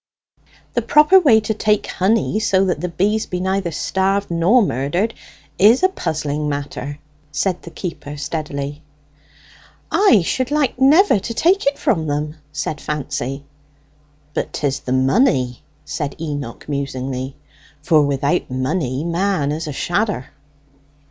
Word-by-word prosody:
"The -, -, +1 dB
proper 305 Hz, +6 st, +6 dB
way 265 Hz, -11 st, +5 dB
to 220 Hz, +1 st, -1 dB
take 210 Hz, 0 st, +1 dB
honey, 215 Hz, +2 st, +1 dB
so 195 Hz, -3 st, +2 dB
that 180 Hz, -5 st, -1 dB
the 180 Hz, -, -2 dB
bees 210 Hz, +6 st, 0 dB
be 180 Hz, -, -3 dB
neither 190 Hz, 0 st, -1 dB
starved 190 Hz, +4 st, -1 dB
nor 180 Hz, +9 st, +4 dB
murdered, 175 Hz, -, -1 dB, 0.5 s
is 225 Hz, -, +6 dB
a 375 Hz, -, +6 dB
puzzling 150 Hz, -, -2 dB
matter," 145 Hz, 0 st, -4 dB, 0.3 s
said 180 Hz, +4 st, -1 dB
the -, -, -10 dB
keeper 160 Hz, -5 st, -6 dB
steadily. 145 Hz, -1 st, -4 dB, 1.1 s
"I 245 Hz, -, +5 dB
should 255 Hz, +8 st, -1 dB
like 290 Hz, -4 st, 0 dB
never 295 Hz, -, +5 dB
to 215 Hz, +4 st, -5 dB
take 365 Hz, -, +2 dB
it 280 Hz, -, +2 dB
from 160 Hz, -2 st, 0 dB
them," 150 Hz, +2 st, -2 dB
said 150 Hz, 0 st, -4 dB
Fancy. 140 Hz, -2 st, -4 dB, 0.9 s
"But -, -, -3 dB
'tis 140 Hz, -2 st, -1 dB
the 125 Hz, -, -6 dB
money," 130 Hz, -, +2 dB, 0.2 s
said 145 Hz, -2 st, -4 dB
Enoch 145 Hz, -7 st, -5 dB
musingly. 135 Hz, -2 st, -3 dB, 0.5 s
"For 155 Hz, -2 st, +4 dB
without 140 Hz, +3 st, 0 dB
money 130 Hz, +1 st, -1 dB
man 170 Hz, -3 st, 0 dB
is 155 Hz, +1 st, -3 dB
a -, -, -3 dB
shadder!" 175 Hz, -, -1 dB
165 Hz, 135 wpm, -19 LUFS, 145-210 Hz, 1.1 s, proper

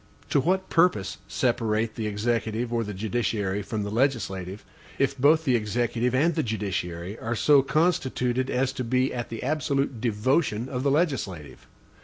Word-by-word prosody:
To -, -, +4 dB
what 185 Hz, +6 st, +1 dB
purpose 165 Hz, -, +2 dB
separate 115 Hz, -3 st, 0 dB
the 110 Hz, -2 st, -3 dB
executive 115 Hz, +2 st, -1 dB
or 115 Hz, -1 st, +1 dB
the 105 Hz, -, -5 dB
judiciary 105 Hz, -1 st, -1 dB
from 105 Hz, +1 st, -3 dB
the 100 Hz, -, -4 dB
legislative, 105 Hz, -6 st, -1 dB, 0.3 s
if 135 Hz, 0 st, +1 dB
both 155 Hz, +4 st, +4 dB
the 130 Hz, -4 st, +3 dB
executive 120 Hz, +2 st, 0 dB
and 160 Hz, +6 st, +3 dB
the 160 Hz, -, 0 dB
judiciary 95 Hz, -, -3 dB
are 120 Hz, +1 st, -2 dB
so 145 Hz, +4 st, +5 dB
constituted 130 Hz, -5 st, 0 dB
as 130 Hz, +1 st, 0 dB
to 130 Hz, -, -3 dB
be 130 Hz, +2 st, +1 dB
at 120 Hz, -1 st, -4 dB
the 115 Hz, -, -6 dB
absolute 135 Hz, -3 st, -1 dB
devotion 120 Hz, +1 st, +1 dB
of 125 Hz, -2 st, -3 dB
the 140 Hz, -, +1 dB
legislative? 100 Hz, -, -2 dB
120 Hz, 160 wpm, -26 LUFS, 105-135 Hz, 0.3 s, so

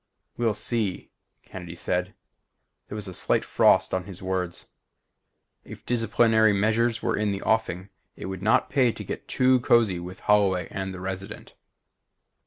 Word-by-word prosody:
"We'll 115 Hz, -3 st, 0 dB
see," 105 Hz, -3 st, -2 dB, 0.3 s
Kennedy 90 Hz, -2 st, -9 dB
said. 90 Hz, +2 st, -2 dB, 0.7 s
There -, -, -7 dB
was 105 Hz, -1 st, -5 dB
a 95 Hz, -, -7 dB
slight -, -, 0 dB
frost -, -, +3 dB
on 95 Hz, -1 st, -1 dB
his 95 Hz, -3 st, -9 dB
words. 95 Hz, -2 st, -3 dB, 1.0 s
If -, -, -12 dB
disciplinary 115 Hz, -2 st, +3 dB
measures 110 Hz, +3 st, +1 dB
were -, -, +1 dB
in 105 Hz, -1 st, 0 dB
the 100 Hz, 0 st, -4 dB
offing 105 Hz, -4 st, 0 dB, 0.3 s
it -, -, -8 dB
would 95 Hz, -1 st, -5 dB
pay -, -, -8 dB
not 110 Hz, -, +3 dB
to 125 Hz, -5 st, +1 dB
get -, -, -7 dB
too 130 Hz, 0 st, +3 dB
cozy 115 Hz, -7 st, +3 dB
with 90 Hz, +2 st, -9 dB
Holloway 100 Hz, -3 st, +2 dB
and 95 Hz, 0 st, -4 dB
the 95 Hz, -, -8 dB
Resident. 95 Hz, +1 st, -6 dB
100 Hz, 155 wpm, -25 LUFS, 95-110 Hz, 1.0 s, frost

